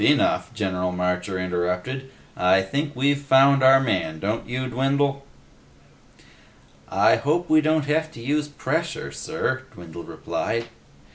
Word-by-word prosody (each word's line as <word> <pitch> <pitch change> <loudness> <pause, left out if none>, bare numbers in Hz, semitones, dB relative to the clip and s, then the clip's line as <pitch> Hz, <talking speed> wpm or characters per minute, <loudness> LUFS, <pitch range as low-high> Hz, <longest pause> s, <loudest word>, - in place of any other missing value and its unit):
Enough," - - +2
General 90 -3 -1
Marcher 90 +1 -2
interrupted. 90 +9 -2 0.3
"I 95 +1 +3
think 145 +9 -3
we've 140 +2 +1
found 140 0 +5
our 135 0 +7
man, 95 -11 -1
don't 105 +7 -3
you, 130 +1 -2
Dwindle?" 135 +2 0 1.7
"I - - +4
hope 165 +5 -1
we 155 0 +6
don't 155 -1 +1
have 155 +2 0
to - - -11
use 145 +5 -1
pressure, 150 - -3
sir," 70 - -3
Dwindle 85 -1 -9
replied. 115 +6 -3
130 Hz, 130 wpm, -23 LUFS, 90-145 Hz, 1.7 s, our